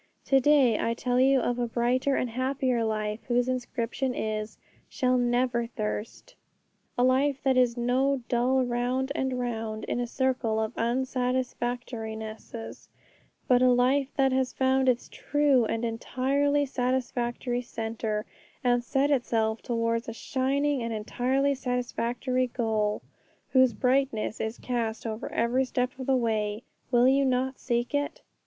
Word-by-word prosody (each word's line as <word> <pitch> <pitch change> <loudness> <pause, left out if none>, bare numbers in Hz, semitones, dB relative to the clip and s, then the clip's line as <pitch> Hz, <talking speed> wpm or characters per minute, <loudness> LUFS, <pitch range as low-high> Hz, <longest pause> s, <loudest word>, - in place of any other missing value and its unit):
To 270 - +4
day 265 -5 +4
I 230 - 0
tell 250 +1 0
you 265 +1 +5
of 245 0 -1
a 240 - 0
brighter 250 +4 +1
and 250 - -1
happier 255 -1 0
life, 215 -1 -2
whose 245 0 +2
inscription 250 0 -2
is, 215 0 -3 0.3
'Shall 255 -3 +1
never 240 -1 +1
thirst,' 215 -1 -5 0.6
a 245 - +3
life 270 +2 +2
that 265 -1 +3
is 250 -1 +3
no 255 +2 +1
dull 255 +2 +2
round 245 +2 -1
and 265 -2 -1
round 225 -3 -3
in - - -2
a 245 - -1
circle 250 -3 0
of 220 +1 -2
unsatisfactorinesses, 240 -3 -3 0.6
but 250 -1 +4
a 255 - +6
life 255 +3 +3
that 270 -2 +3
has 260 0 0
found 265 0 +2
its 245 -1 0
true 290 -5 +2
and 225 +2 -1
entirely 275 +5 0
satisfactory 245 -1 -1
centre, 225 -2 -3 0.4
and 245 -1 +2
set 275 +4 +1
itself 225 -4 +1
towards 230 -1 -1
a - - -5
shining 275 +4 0
and 230 -1 -3
entirely 260 +6 0
satisfactory 250 0 -1
goal, 220 -3 -1 0.5
whose 260 -2 +6
brightness 250 -2 0
is 220 +1 -3
cast 230 -3 -3
over 220 0 -4
every 240 +3 +1
step 250 0 -1
of 260 - -5
the 265 -1 +3
way. 215 -2 -1 0.3
Will 245 0 +4
you 275 +1 +4
not 260 0 0
seek 240 0 -1
it? 290 +13 -2
245 Hz, 145 wpm, -27 LUFS, 230-260 Hz, 0.6 s, a